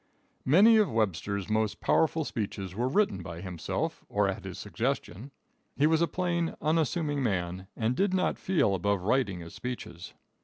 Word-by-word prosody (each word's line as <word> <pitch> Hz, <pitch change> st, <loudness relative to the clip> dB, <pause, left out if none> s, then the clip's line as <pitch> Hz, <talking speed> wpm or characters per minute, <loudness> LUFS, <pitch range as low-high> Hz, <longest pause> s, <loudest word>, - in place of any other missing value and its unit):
Many 205 Hz, -, +7 dB
of 215 Hz, -2 st, +3 dB
Webster's 100 Hz, -2 st, -1 dB
most 110 Hz, 0 st, 0 dB
powerful 160 Hz, -1 st, +2 dB
speeches 100 Hz, -7 st, -4 dB
were 120 Hz, +6 st, -1 dB
written 145 Hz, -, +1 dB
by 85 Hz, 0 st, -7 dB
himself 90 Hz, -3 st, -4 dB
or -, -, +2 dB
at -, -, -4 dB
his -, -, -6 dB
suggestion. 110 Hz, +10 st, -3 dB, 0.5 s
He 140 Hz, -, +4 dB
was 160 Hz, +1 st, +3 dB
a 170 Hz, -, +3 dB
plain, 170 Hz, -2 st, -1 dB
unassuming 155 Hz, -1 st, 0 dB
man, 95 Hz, -5 st, -2 dB
and 115 Hz, +2 st, 0 dB
did 195 Hz, +4 st, +2 dB
not 185 Hz, -1 st, 0 dB
feel 175 Hz, -, +2 dB
above 100 Hz, 0 st, 0 dB
writing 100 Hz, -4 st, +1 dB
his 85 Hz, 0 st, -10 dB
speeches. 90 Hz, -8 st, -7 dB
115 Hz, 160 wpm, -29 LUFS, 95-160 Hz, 0.5 s, Many